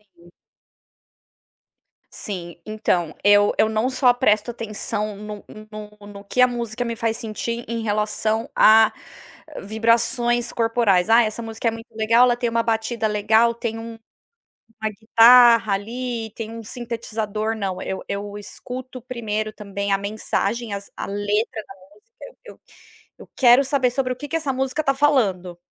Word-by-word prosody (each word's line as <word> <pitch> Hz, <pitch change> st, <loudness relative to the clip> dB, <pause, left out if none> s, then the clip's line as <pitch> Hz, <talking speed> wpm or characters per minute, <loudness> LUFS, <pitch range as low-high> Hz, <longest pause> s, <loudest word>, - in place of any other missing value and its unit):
Sim. 175 Hz, 0 st, -19 dB, 1.8 s
Sim. 175 Hz, -4 st, -6 dB
Então, 180 Hz, -7 st, -1 dB
eu 205 Hz, 0 st, +5 dB
eu 220 Hz, -, +4 dB
não 220 Hz, +3 st, 0 dB
só 255 Hz, -1 st, +3 dB
presto 230 Hz, -2 st, +1 dB
atenção 215 Hz, -2 st, -4 dB
no 210 Hz, 0 st, -8 dB, 0.3 s
no 210 Hz, 0 st, -10 dB
no 200 Hz, -1 st, -11 dB
que 250 Hz, +5 st, 0 dB
a 250 Hz, -, +7 dB
música 240 Hz, 0 st, -4 dB
me 235 Hz, -, -3 dB
faz 225 Hz, 0 st, -1 dB
sentir 230 Hz, +2 st, -5 dB
em 230 Hz, 0 st, -3 dB
relação 215 Hz, +1 st, -1 dB
a 220 Hz, 0 st, +6 dB, 0.7 s
vibrações 235 Hz, +3 st, +1 dB
corporais. 225 Hz, -5 st, +2 dB
"Ah, 230 Hz, +1 st, +6 dB
essa 215 Hz, +2 st, -3 dB
música 225 Hz, +1 st, -4 dB
é -, -, +3 dB
muito 230 Hz, +1 st, -10 dB
legal, 230 Hz, +2 st, +4 dB
ela 240 Hz, -1 st, +2 dB
tem 240 Hz, -1 st, -1 dB
uma 230 Hz, 0 st, 0 dB
batida 225 Hz, 0 st, -1 dB
legal, 220 Hz, +3 st, +3 dB
tem 230 Hz, -1 st, -4 dB
um 230 Hz, 0 st, -8 dB, 0.9 s
uma 220 Hz, -, 0 dB
guitarra, 230 Hz, 0 st, +6 dB
ali, 230 Hz, +2 st, -4 dB
tem 225 Hz, -1 st, -6 dB
um 230 Hz, 0 st, -8 dB
sintetizador". 225 Hz, -2 st, -4 dB
Não, 195 Hz, -3 st, -3 dB
eu 190 Hz, -, -4 dB
eu 205 Hz, +1 st, -5 dB
escuto, 255 Hz, +5 st, -8 dB
primeiro 215 Hz, -3 st, -4 dB
também, 200 Hz, -1 st, -4 dB
a 195 Hz, -, +3 dB
mensagem, 210 Hz, +2 st, -2 dB
as 200 Hz, 0 st, -8 dB
a -, -, -5 dB
letra 205 Hz, +2 st, -2 dB
da -, -, -12 dB, 0.2 s
música. -, -, -16 dB, 0.2 s
Eu -, -, -11 dB
eu -, -, -35 dB, 0.6 s
eu -, -, -13 dB
quero 250 Hz, +1 st, +6 dB
saber 265 Hz, -3 st, +1 dB
sobre 255 Hz, 0 st, -1 dB
o -, -, -13 dB
que 290 Hz, +3 st, -8 dB
que 325 Hz, -, -4 dB
essa 310 Hz, -4 st, -1 dB
música 265 Hz, +3 st, -1 dB
está 275 Hz, -2 st, +1 dB
falando. 205 Hz, -12 st, +1 dB
225 Hz, 160 wpm, -22 LUFS, 210-240 Hz, 1.8 s, a